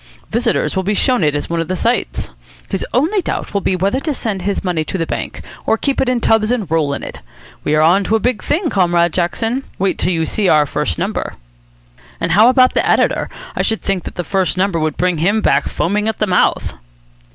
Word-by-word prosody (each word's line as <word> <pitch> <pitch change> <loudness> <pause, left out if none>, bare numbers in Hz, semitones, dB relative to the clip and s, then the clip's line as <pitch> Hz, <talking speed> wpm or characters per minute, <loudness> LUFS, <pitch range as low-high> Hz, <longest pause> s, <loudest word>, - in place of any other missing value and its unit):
Visitors 235 -1 0
will 190 - +1
be 205 +3 -1
shown 250 -3 +2
it 150 -1 +2
as 145 - -2
one 170 0 -1
of 165 - -4
the 185 - -1
sights. 235 +6 -1 0.4
His 195 - -2
only 330 - +1
doubt - - -4
will 200 - 0
be 190 - 0
whether 195 +8 0
to 295 0 -2
send 210 -6 -3
his 200 +2 -2
money 175 -4 0
to 175 - -4
the 165 - -1
bank - - -5 0.2
or 225 - +3
keep 275 +3 0
it 260 - +1
in 250 -1 +1
tubs 220 -1 +2
and 240 -4 0
roll 150 -3 +1
in - - -7
it. - - -8 0.4
We 150 - +1
are 155 - +4
on 180 +5 +4
to 220 - +1
a - - +2
big 245 -1 0
thing, 315 +1 -1
Comrade 175 -3 +2
Jackson. 225 +9 -1
Wait 195 0 0
till - - +1
you 165 -2 0
see 200 +3 0
our 150 -1 +5
first 140 - -2
number." - - -3 0.9
"And - - -1
how 215 +7 +6
about 255 0 +4
the - - +2
editor? - - +1 0.3
I - - 0
should 220 - -1
think 195 -3 -1
that 175 - -5
first 190 -2 0
number 185 -2 +1
would 155 -1 -1
bring 180 -3 +1
him 200 +7 +2
back - - +2
foaming 210 +4 -1
at 220 - -1
the 215 - +1
mouth." 180 -3 +1
195 Hz, 230 wpm, -17 LUFS, 170-225 Hz, 0.9 s, how